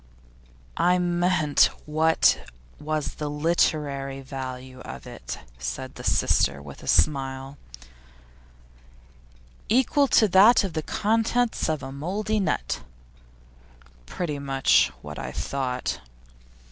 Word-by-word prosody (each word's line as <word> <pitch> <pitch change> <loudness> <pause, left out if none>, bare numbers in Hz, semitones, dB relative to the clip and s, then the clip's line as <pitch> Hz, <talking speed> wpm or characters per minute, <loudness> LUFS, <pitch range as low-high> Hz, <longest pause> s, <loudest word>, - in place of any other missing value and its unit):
'I 180 +1 +3
meant, 175 -4 +3 0.2
what 155 - +2 0.3
was 155 0 -2
the 150 -1 -3
literary 145 -3 0
value 130 -1 -7
of 65 - -9
it?' 60 0 -7 0.2
said 60 0 -5
his - - 0
sister, 70 0 +2
with 70 -1 -11
a - - -11
smile. 135 -2 +1 2.1
'Equal 265 +5 +3
to 220 - +5
that 205 +6 +6
of 190 -4 -3
the 155 - -1
contents 225 +6 0
of 155 -4 -2
a 135 - -6
mouldy 200 +10 -2
nut.' 185 -6 -1 1.3
'Pretty 150 - -4
much 135 -1 +3 0.2
what 75 0 -7
I - - -5
thought. 130 -2 -3
150 Hz, 110 wpm, -25 LUFS, 135-180 Hz, 2.1 s, that